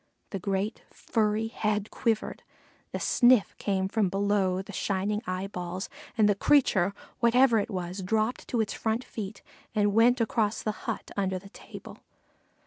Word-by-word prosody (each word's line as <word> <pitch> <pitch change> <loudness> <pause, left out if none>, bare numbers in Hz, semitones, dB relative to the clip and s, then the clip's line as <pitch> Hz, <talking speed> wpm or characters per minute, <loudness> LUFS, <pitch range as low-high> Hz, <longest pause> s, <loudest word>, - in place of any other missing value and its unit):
The 195 - -3
great 195 +3 -2
furry 215 0 0
head 210 -2 -1
quivered, 225 -2 -1 0.5
a - - -3
sniff 245 -4 +4
came 190 -2 0
from 200 -1 +1
below 195 -1 +1
the 205 - -10
shining 200 +3 -1
eyeballs, 185 0 -4 0.3
and 215 -2 +5
the 205 - +4
creature, 200 -5 +3 0.2
whatever 235 -1 +5
it 205 - -2
was, 185 -1 -4
dropped 220 +5 -1
to 235 - +1
its 215 - -2
front 225 +2 -1
feet 205 -4 -7 0.3
and 205 -1 +2
went 240 +4 +5
across 220 -2 0
the 215 - 0 0.2
hut - - -4
under 190 -2 0
the 195 +2 -11
table. - - -11
205 Hz, 150 wpm, -28 LUFS, 190-225 Hz, 0.5 s, and